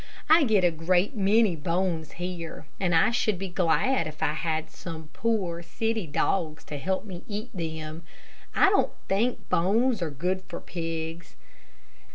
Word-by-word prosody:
I 320 -2 +7
get 215 -6 +3
a 175 - +5
great 175 - +1
many 205 -1 +4
bones 165 0 -1
here, 175 -2 -5
and 175 -3 +2
I 165 - +5
should 215 -4 +1
be 195 +1 -4
glad 180 +5 +2
if 155 0 -6
I 150 - +2
had 160 0 -2
some 160 -2 -8
poor, 195 -7 0
city 220 +3 -2
dogs 155 +1 0
to 145 - -6
help 190 +7 -1
me 185 -3 -8
eat 215 +3 -5
them. 160 -2 -4 0.5
I 390 - +6
don't 400 - +2
think 225 +6 0
bones 220 +6 +2
are 165 - 0
good 180 +6 -1
for 175 - -6
pigs. 165 0 -5
175 Hz, 160 wpm, -27 LUFS, 160-205 Hz, 0.5 s, I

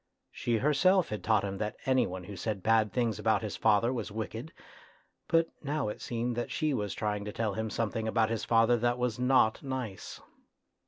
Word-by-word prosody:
She 120 -1 -1
herself 165 - +3
had 105 - -4
taught 110 -3 +3
him 100 -1 -4
that 105 0 -2
any 130 -1 +3
one 90 0 -6
who 100 +3 -8
said 100 +1 -3
bad 110 -2 +3
things 115 -4 0
about 110 0 +2
his 105 - -4
father 115 +3 +3
was 115 -5 -4
wicked, 110 -2 -5 0.8
but 165 0 +3
now 145 -4 -1
it - - -7
seemed 120 0 -2
that 120 - -3
she 155 -2 0
was 105 -5 -2
trying 105 -1 -2
to 105 - -4
tell 110 -1 -1
him 110 +2 -3
something 110 0 -2
about 110 0 +2
father 115 +2 +3
that 120 +1 +1
was 125 -2 -1
not 125 -3 +3
nice. 130 -8 -5
115 Hz, 195 wpm, -30 LUFS, 105-125 Hz, 0.8 s, herself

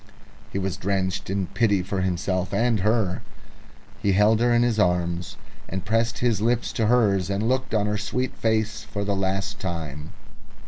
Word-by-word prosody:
He - - -3
was 95 -2 -2
drenched 95 0 -1
in 95 -1 0
pity 100 0 +1
for 95 +1 -2
himself 95 0 -1
and 115 -2 +2
her. 105 -2 +1 0.8
He 100 - +2
held 105 +3 +4
her 120 +1 +3
in 120 0 +4
his 120 -2 +1
arms, 90 -2 0 0.3
and 95 0 -4
pressed 115 +2 +1
his 115 -3 +1
lips 120 +2 +1
to 110 - +1
hers, 100 -6 +3
and 100 +3 0
looked 130 -2 0
on 105 -1 +2
her 105 0 -1
sweet 125 +5 -2
face 110 -1 0
for 100 - -4
the 100 0 0
last 100 +1 -1
time. 80 -6 -5
100 Hz, 175 wpm, -24 LUFS, 95-110 Hz, 0.8 s, held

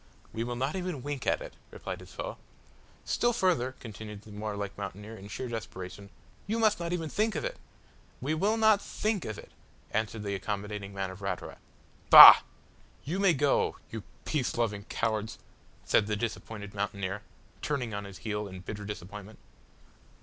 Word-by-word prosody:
"We 115 - -2
will 120 +1 -3
not 135 +6 -1
even 180 -8 -3
wink 145 -2 -4
at - - +2
it," - - -9 0.2
replied - - -6
his - - -13
foe. - - -5 0.7
"Still 240 0 +2
further," 165 - +1
continued 105 -2 -9
the 110 - -13
warlike 105 -1 -4
mountaineer 100 +2 -7
in 100 -2 -10
sheer 115 +5 -5
desperation, 100 -4 -7 0.4
"you 220 +3 0
must 220 -3 +3
not 170 0 -3
even 170 -2 -1
think 215 +5 0
of 150 - -2
it." - - -4 0.6
"We 140 +5 -1
will 205 +8 +1
not 220 -2 +5
think 210 -3 -2
of 110 - -4
it" - - -12 0.4
answered 110 0 -2
the 100 -1 -2
accommodating 100 +1 -4
man 95 -1 -3
of 95 +2 -11
Ratura. 95 - -4 0.5
"Bah! - - +14 0.7
you 170 +7 -2
may 195 -4 +4
go 140 +1 +2 0.2
you 110 - -5 0.2
peace 140 -7 -1
loving 105 -4 -1
cowards," 110 -1 -2 0.5
said 105 - +3
the 105 - 0
disappointed 105 -2 -5
mountaineer, 100 -1 -3 0.4
turning 125 -6 -2
on 100 0 -4
his 100 -2 -9
heel 105 -1 -2
in 95 -1 -9
bitter 105 +2 -6
disappointment. 105 +1 -8
110 Hz, 170 wpm, -30 LUFS, 100-150 Hz, 0.7 s, Bah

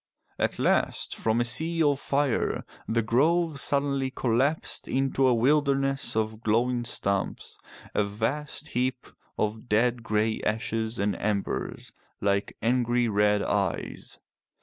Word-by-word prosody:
At - - 0
last, - - +1
from 110 +1 0
a 120 - +2
sea 165 +7 +2
of 145 -2 +2
fire, 140 -3 0 0.2
the 115 0 +1
grove 155 +6 +2
suddenly 140 -1 +1
collapsed 130 +4 0
into 135 0 +1
a 125 - +4
wilderness 135 +1 +2
of 110 0 -1
glowing 120 +2 +1
stumps, 100 -4 -2 0.3
a 105 - +2
vast 115 +9 -3
heap 125 +1 -1 0.3
of 110 +3 -2
dead 120 +3 +2
grey 110 0 0
ashes 110 +1 -1
and 100 +1 0
embers 100 -1 -2 0.3
like 100 0 0
angry 120 0 +2
red 105 0 +2
eyes. 100 -4 -2
120 Hz, 125 wpm, -27 LUFS, 110-135 Hz, 0.3 s, a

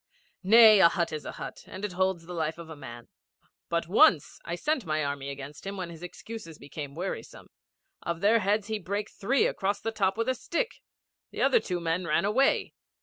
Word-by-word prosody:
'Nay, 215 +1 +8
a 170 - +8
hut 170 -1 -1
is 155 - -5
a - - -5
hut, - - -8
and 195 - -6
it 205 - -4
holds 185 -2 0
the 180 - -8
life 160 -1 -2
of 165 -1 -10
a - - -7
man. 120 -4 -10 0.6
But 170 0 -1
once, 170 -5 +4
I 170 - -4
sent 295 - -1
my 155 -2 -1
army 140 -1 -3
against 140 +1 -8
him 200 0 -5
when 180 -2 -5
his 165 -1 -11
excuses 180 -2 -9
became 140 0 -8
wearisome: 180 +4 -6 0.5
of 170 -1 -3
their 215 +3 +5
heads 205 +1 +1
he 220 0 -3
brake 200 +3 -4
three 240 +7 +1
across 200 +1 -1
the 225 - -3
top 195 -2 0
with 230 - -1
a 260 - +2
stick. 460 - -3 0.5
The - - -2
other 475 - +5
two 180 - -3
men 170 +1 -1
ran 155 +4 +2
away. 255 +7 +2
180 Hz, 205 wpm, -28 LUFS, 160-210 Hz, 0.6 s, Nay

